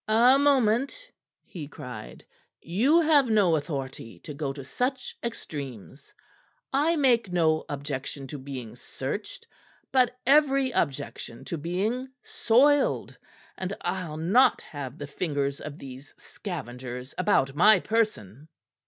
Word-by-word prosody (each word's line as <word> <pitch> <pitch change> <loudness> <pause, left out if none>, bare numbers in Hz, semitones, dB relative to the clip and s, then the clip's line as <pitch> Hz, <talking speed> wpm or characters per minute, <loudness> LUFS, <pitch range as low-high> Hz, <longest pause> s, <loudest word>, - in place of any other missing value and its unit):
"A 240 +5 +5
moment!" 280 - +2 0.3
he 160 -7 -8
cried. 125 -6 -9 0.3
"You 255 - +3
have 300 -4 +4
no 200 -7 +4
authority 135 -6 -5
to 150 - -8
go 140 -1 -3
to 135 0 -8
such 250 - -2
extremes. 140 - -7 0.6
I 300 +5 +3
make 240 - +3
no 160 -3 +2
objection 140 -1 -4
to 145 - -6
being 130 -4 -7
searched; 145 - -6 0.5
but 250 -2 +3
every 275 -1 +4
objection 140 - -3
to 170 - -3
being 200 - -1 0.2
soiled, 275 +5 +2 0.4
and 190 +1 -4
I'll 170 -5 -3
not 200 +12 +4
have 140 -2 -7
the 145 - -6
fingers 140 -2 -2
of 150 -1 -7
these 135 +1 -11
scavengers 125 - -7
about 135 -6 +2
my 190 +6 +6
person." 160 - -1
170 Hz, 120 wpm, -27 LUFS, -, 0.6 s, my